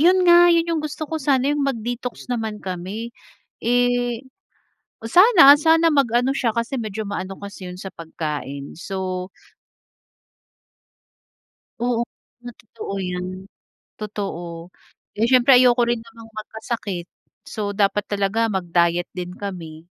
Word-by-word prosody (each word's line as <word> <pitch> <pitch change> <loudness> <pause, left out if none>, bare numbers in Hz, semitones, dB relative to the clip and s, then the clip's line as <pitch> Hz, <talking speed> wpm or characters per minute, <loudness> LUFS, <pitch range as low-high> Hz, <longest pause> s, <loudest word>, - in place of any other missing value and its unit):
yun 365 +3 +5
nga, 350 0 +7
yun 335 -1 +4
yung 325 - 0
gusto 305 +1 -5
ko 315 +1 -4
sana. 275 0 +2
Yung 295 - -1
mag-detox 245 -1 -4
naman 220 -3 -3
kami, 195 +6 -5 0.5
eh, 245 0 +1 0.8
sana 345 - +8
sana 325 +1 +4
mag-ano 250 -3 +2
siya 235 -5 0
kasi 235 +3 -2
medyo 220 -1 -4
ma-ano 195 -1 -4
kasi 200 -2 -8
yun 180 0 -8
sa 190 0 -7
pagkain. 150 -4 -6
So 185 -1 -4 2.5
Oo 240 -1 0 0.4
nga, 245 - -7
totoo 205 -2 -8
yan. 185 +1 -5 0.5
Totoo. 175 -5 -6 0.4
Eh, 225 +3 +1
siyempre 255 +1 +6
ayoko 250 -1 +6
rin 235 -1 -1
namang 230 0 -14
magkasakit. 215 -4 -5 0.4
So, 210 -2 -4
dapat 205 0 +1
talaga 205 +3 0
mag-diet 175 -2 +1
din 180 -1 -5
kami. 165 -5 -7
220 Hz, 125 wpm, -22 LUFS, 185-250 Hz, 2.5 s, sana